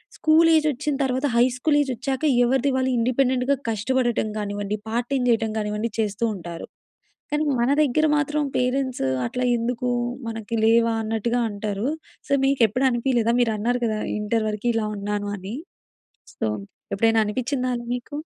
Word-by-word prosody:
School 320 +1 +4
ఏజొచ్చిన 300 -1 +1
తర్వాత 260 +1 0
high 240 - +6
school 295 +3 +2
age 275 -2 -1
వచ్చాక 265 +4 -3 0.2
ఎవరిది 265 +2 +2
వాళ్ళు 260 0 +1
ఇండిపెండెంట్‌గా 255 +2 +2
కష్టపడటం 235 +1 0
కానివ్వండి, 205 0 -3
పార్ట్ 240 +1 -1
టైమ్ 255 -2 +1
చేయటం 225 -1 +2
కానివ్వండి, 210 +1 -2
చేస్తూ 210 +1 0
ఉంటారు. 170 -2 -7 0.7
కానీ 300 +1 +1 0.2
మన 240 - +2
దగ్గర 305 +3 +2
మాత్రం 295 +1 0
పేరెంట్స్ 255 - 0 0.2
అట్లా 250 - -2
ఎందుకు 245 +1 -2 0.4
మనకి 225 0 -5
లేవా 230 +1 +4
అన్నట్టుగా 225 +2 -1
అంటారు. 205 +2 -3 0.4
సో - - -4
మీకు 270 -1 +1
ఎప్పుడు 255 +6 -1
అనిపియలేదా? 240 -1 +1
మీరు 230 -2 +2
అన్నారు 245 +4 0
కదా! 215 -1 -1 0.2
ఇంటర్ 215 +1 0
వరకు 215 +3 -2
ఇలా 220 -1 0
ఉన్నాను 205 0 -3
అని, 195 +4 -7 0.8
సో - - -2 0.5
ఎప్పుడైనా 225 +2 +3
అనిపించిందా 255 +4 -1
అండి 240 0 -6
మీకు? 290 +4 -7
240 Hz, 150 wpm, -23 LUFS, 215-260 Hz, 0.8 s, high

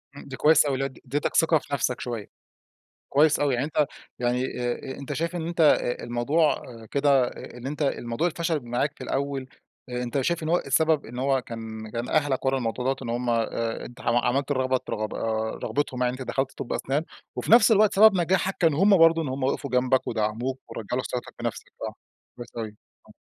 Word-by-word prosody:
إمم. - - -10
دي 135 - -6
كويس 155 0 +5
أوي 140 - 0
اللي 135 +1 0
هو - - -2
اد 130 - -17
اديتك 140 +3 -2
ثقة 165 -1 +5
في 145 - -11
نفسك 125 -2 0
شوية. 115 -4 -4 0.8
كويس 150 +2 +4
أوي، 145 -3 +2
يعني 125 +3 0
أنت 150 -1 +1 0.3
يعني 125 +1 +1
آآ 125 +2 -3
أ - - -14
أنت 140 - -5
شايف 170 +2 -2
إن 165 -1 -3
أنت 170 0 -1
آآ 145 -5 +3
الموضوع 140 +7 +1 0.3
كده 140 -3 +3
إن 125 +1 -8
أنت 150 +2 -5
الموضوع 135 +2 0
الفشل 165 -2 -1
معاك 120 +5 -1
في - - -8
الأول، 140 -1 -2 0.4
أنت 125 +2 -2
شايف 170 +4 0
إن 155 - -2
هو 175 - +4
السبب 160 -3 +2
إن 120 +2 -7
هو 135 0 +2
كان 110 -2 -7
كان 120 +2 -4
أهلك 145 -4 +1
ورا 135 0 +2
الموضوع 125 0 -2
دوّة، 135 0 +2
إن 120 - -5
هم 120 +1 -1
آآ 115 0 -1
أنت 120 - -11
حم 115 - +1
عملت 130 +4 +1
الرغبة 130 -1 +1
ت - - -14
رغب 110 0 -3
آآ 110 0 -2
رغبتهم 140 -3 -1
يعني، 125 0 +2
إن 130 - -8
أنت 130 - -6
دخلت 135 0 0
طب 120 - -4
أسنان، 140 +4 -1 0.3
وفي - - -3
نفس 230 -1 +8
الوقت 215 -1 +5
سبب 215 0 +7
نجاحك 185 +3 +1
كان 165 -3 +4
هم 195 +6 +5
برضه، 165 0 +6
إن 155 - -3
هم 130 +1 -3
وقفوا 140 +1 -1
جنبك، 125 +1 +2
ودعموك، 115 +4 -1
ورجعوا 120 +4 -3
لك - - -6
ثقتك 125 - -4
في - - -6
نفسك - - -3 0.2
صح. - - -4 0.4
ده 120 - -7
صحيح. 110 -2 -4 0.3
آه. - - -16
135 Hz, 220 wpm, -26 LUFS, 120-150 Hz, 0.8 s, نفس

